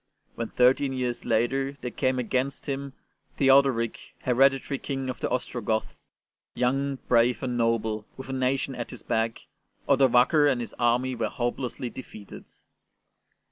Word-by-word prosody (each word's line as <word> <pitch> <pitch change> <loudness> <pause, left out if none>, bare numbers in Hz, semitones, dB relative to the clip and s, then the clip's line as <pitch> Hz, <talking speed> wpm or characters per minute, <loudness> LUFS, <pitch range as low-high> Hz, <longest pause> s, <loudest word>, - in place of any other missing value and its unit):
When, 115 - -4
thirteen 130 +2 +3
years 125 -2 -3
later, 135 +5 +1
there 125 - -4
came 130 +3 0
against 130 +2 -1
him 140 -1 -4 0.4
Theodoric, 135 -4 +4 0.2
hereditary 135 +2 +2
King 135 -2 -3
of 125 - -10
the - - -2
Ostrogoths, 115 -3 -3 0.5
young, 135 +3 0
brave, 120 +2 +3
and 125 -1 -2
noble, 110 -2 0
with 130 - -8
a 135 - -4
nation 130 +1 0
at 120 -2 -5
his 125 - -10
back, 115 0 -1 0.4
Odovaker 140 +2 +5
and 130 - -1
his 120 - -5
army 125 +2 +2
were 115 -3 -2
hopelessly 120 0 -3
defeated. 110 -5 -11
125 Hz, 140 wpm, -26 LUFS, 120-135 Hz, 0.5 s, Odovaker